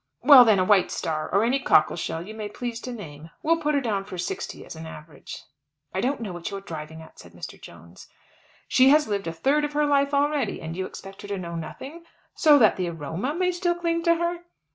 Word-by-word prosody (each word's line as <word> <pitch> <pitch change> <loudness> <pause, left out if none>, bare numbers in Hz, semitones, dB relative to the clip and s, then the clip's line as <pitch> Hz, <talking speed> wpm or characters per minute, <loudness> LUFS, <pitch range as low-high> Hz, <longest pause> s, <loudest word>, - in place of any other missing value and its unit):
"Well, 270 -1 +10
then, 215 -3 +5
a 185 - +2
White 195 -2 +4
Star 155 -1 -3
or 200 +3 +3
any 250 +4 +1
cockle 155 -11 +3
shell 165 0 -4
you 215 - -8
may 215 -1 -6
please 235 +2 -5
to 250 - -6
name. 160 -9 -9
We'll 330 +1 +2
put 300 -1 +1
her 280 - +2
down 210 -6 -1
for 185 - -9
sixty 175 - -5
as - - -9
an 160 0 -8
average." 155 -2 -10 0.5
"I 190 - -1
don't 265 +2 -1
know 205 -5 -5
what 175 -1 -5
you 200 - -5
are - - -8
driving 160 -3 -8
at," 160 - -17
said - - -14
Mr. - - -9
Jones. 85 +3 -14 0.6
"She 260 +1 +5
has 300 +1 +4
lived 200 -3 -2
a - - -1
third 275 - +1
of 295 0 -2
her 300 0 +2
life 280 -1 +2
already, 290 +1 0
and 160 +1 -6
you 185 +1 -3
expect 195 0 -11
her - - -9
to 200 -1 -3
know 170 -2 -6
nothing, 270 - -8 0.3
so 300 -3 +5
that 220 -6 +4
the 180 -2 -1
aroma 170 - -4
may 365 +1 +1
still 350 0 0
cling 335 -1 -1
to 335 0 +5
her. 340 +1 -2
215 Hz, 240 wpm, -25 LUFS, -, 0.6 s, Well